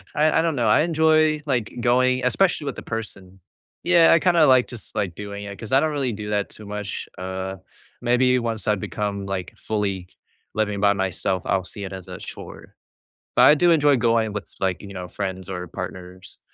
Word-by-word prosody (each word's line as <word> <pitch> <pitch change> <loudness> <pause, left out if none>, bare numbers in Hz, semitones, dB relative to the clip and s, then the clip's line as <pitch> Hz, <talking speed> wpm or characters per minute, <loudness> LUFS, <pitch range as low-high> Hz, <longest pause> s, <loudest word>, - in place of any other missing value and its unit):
I 155 +1 +3
I - - +4
don't 165 -2 0
know, 120 -4 +1
I 105 - +5
enjoy 155 -1 +3
like 125 -7 -1
going 130 +1 +2
especially 165 +4 +2
with 140 - -4
a - - -5
person. 100 -4 -7 0.4
Yeah, 170 -2 +5
I 165 - +5
kinda 170 -2 +4
like 130 -3 +5
just 120 -4 -10
like 100 -6 -2
doing 100 0 -7
it 100 -1 -8
'cause 110 - -8
I 135 - +6
don't 155 +2 +1
really 140 -4 -1
do 105 0 -6
that 105 -1 -1
too 110 - -12
much, 105 -1 -5
uh, 95 +1 -5 0.4
maybe 125 +1 +3
once 115 -2 -3
I 105 - +3
become 100 0 -4
like 95 -2 -4
fully 100 -4 -2 0.5
living 105 -2 -1
by 100 0 +4
myself, 95 -1 -1
I'll 95 -1 +1
see 100 +2 -7
it 95 - -7
as 95 -2 -8
a - - -7
chore, - - -10 0.6
but - - +6
I 150 - +8
do 175 +3 +4
enjoy 145 -4 +4
going 115 -2 +1
with 105 - -6
like, 95 -3 -1
you 100 -1 -10
know, 90 -2 -6
friends 95 0 -5
or 90 -1 -5
partners 90 +2 -8
105 Hz, 205 wpm, -23 LUFS, 95-130 Hz, 0.6 s, I